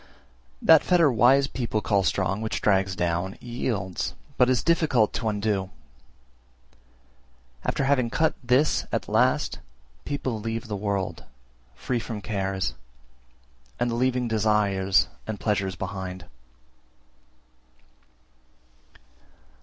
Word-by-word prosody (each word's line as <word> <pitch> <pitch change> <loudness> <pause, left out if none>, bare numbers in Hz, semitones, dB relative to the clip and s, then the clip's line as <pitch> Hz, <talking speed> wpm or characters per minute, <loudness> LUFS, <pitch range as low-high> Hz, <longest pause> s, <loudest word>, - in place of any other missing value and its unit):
346. - - -10
That 160 -2 +7
fetter 170 -5 +5
wise 125 +4 +5
people 120 -5 -2
call 100 -2 +1
strong 95 +1 0
which 110 - -2
drags 95 -1 +2
down, 90 +2 -1
yields, 115 -6 -3 0.2
but 125 0 +4
is 130 -2 +2
difficult 150 -10 +2
to 115 -1 -1
undo; 100 -2 -1 1.9
after 135 - -1
having 135 -3 +2
cut 160 +7 +1
this 125 +5 +2
at - - -2
last, - - +1 0.4
people 130 - -3
leave 115 +2 -4
the 105 - -3
world, 100 -2 -3 0.5
free 125 -2 -2
from 115 -2 -5
cares, 95 - -2 1.1
and 120 -1 0
leaving 125 0 +1
desires 105 -3 +2 0.2
and 110 -2 -4
pleasures 95 -3 -1
behind. 95 -2 -6
110 Hz, 105 wpm, -25 LUFS, 95-125 Hz, 1.9 s, That